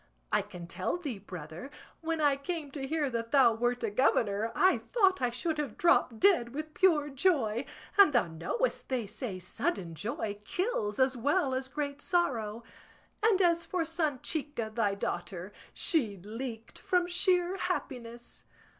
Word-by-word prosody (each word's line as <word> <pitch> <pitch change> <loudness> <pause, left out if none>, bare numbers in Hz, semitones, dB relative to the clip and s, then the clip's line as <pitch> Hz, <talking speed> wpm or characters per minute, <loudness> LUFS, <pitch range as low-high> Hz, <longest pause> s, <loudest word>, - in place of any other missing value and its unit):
I - - +3
can 180 -4 -9
tell 170 - -2
thee, 285 - -5
brother, 175 - -8 0.3
when 325 -1 -2
I 290 -2 +4
came 295 +1 -4
to 270 -1 -5
hear 305 0 0
that 230 -1 -3
thou 260 -5 +6
wert 240 +2 -1
a 225 - 0
governor 220 -2 +2
I 375 +1 +4
thought 385 - +2
I 250 - +2
should 300 +6 -2
have 280 -7 -3
dropped 255 -9 +3
dead 275 -11 +4
with 310 +1 -5
pure 320 -6 +3
joy; 270 - +1 0.3
and 395 -6 +9
thou 240 - +3
knowest 170 - -2
they 250 -4 -1
say 205 -1 -5
sudden 180 - -3
joy 205 +4 -4
kills 215 - -1
as 260 0 +3
well 280 +3 +1
as 260 0 -1
great 285 +1 -4
sorrow; 235 - 0 0.6
and 425 -3 +4
as 340 -1 +3
for 360 -2 0
Sanchica 295 -6 -2
thy 210 -3 +1
daughter, 180 0 -4 0.2
she 245 - +1
leaked 225 +4 -7
from 360 -1 +1
sheer 360 +1 +2
happiness. 245 -10 -4
265 Hz, 155 wpm, -30 LUFS, 220-330 Hz, 0.6 s, and